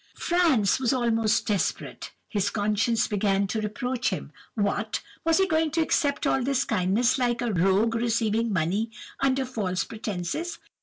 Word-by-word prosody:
"Franz 315 Hz, -, +2 dB
was 255 Hz, -1 st, +1 dB
almost 225 Hz, -3 st, +1 dB
desperate. 205 Hz, -4 st, -2 dB, 0.2 s
His 205 Hz, -2 st, 0 dB
conscience 215 Hz, +2 st, +1 dB
began 200 Hz, -1 st, +1 dB
to 215 Hz, +3 st, -2 dB
reproach 245 Hz, +4 st, -2 dB
him. -, -, -5 dB, 0.2 s
What! 210 Hz, 0 st, -1 dB, 0.2 s
was 330 Hz, 0 st, +3 dB
he 385 Hz, -, +4 dB
going 320 Hz, -3 st, +1 dB
to -, -, +4 dB
accept 285 Hz, -3 st, 0 dB
all 265 Hz, -, +2 dB
this 275 Hz, +1 st, +1 dB
kindness, 220 Hz, +5 st, +1 dB
like 240 Hz, -2 st, +1 dB
a 235 Hz, -3 st, -1 dB
rogue 195 Hz, +5 st, +2 dB
receiving 230 Hz, -1 st, 0 dB
money 195 Hz, +5 st, 0 dB, 0.3 s
under 270 Hz, 0 st, +1 dB
false 200 Hz, -7 st, -2 dB
pretences? 215 Hz, -, -4 dB
225 Hz, 150 wpm, -26 LUFS, 205-260 Hz, 0.3 s, he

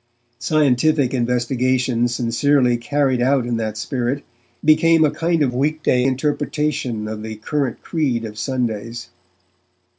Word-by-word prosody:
Scientific 145 Hz, 0 st, +2 dB
investigation 125 Hz, 0 st, +1 dB
sincerely 120 Hz, +2 st, +2 dB
carried 130 Hz, +1 st, 0 dB
out 130 Hz, 0 st, +2 dB
in 120 Hz, -1 st, -1 dB
that 110 Hz, -1 st, -3 dB
spirit 130 Hz, +3 st, -2 dB, 0.4 s
became 160 Hz, +1 st, +5 dB
a 150 Hz, -, +1 dB
kind 165 Hz, 0 st, 0 dB
of 125 Hz, -3 st, 0 dB
weekday 145 Hz, -1 st, +1 dB
interpretation 135 Hz, -4 st, -1 dB
of 110 Hz, 0 st, -5 dB
the 110 Hz, 0 st, -6 dB
current 130 Hz, +3 st, -3 dB
creed 130 Hz, -8 st, -1 dB
of 105 Hz, -1 st, -8 dB
Sundays. 120 Hz, -2 st, -3 dB
130 Hz, 120 wpm, -20 LUFS, 120-145 Hz, 0.4 s, became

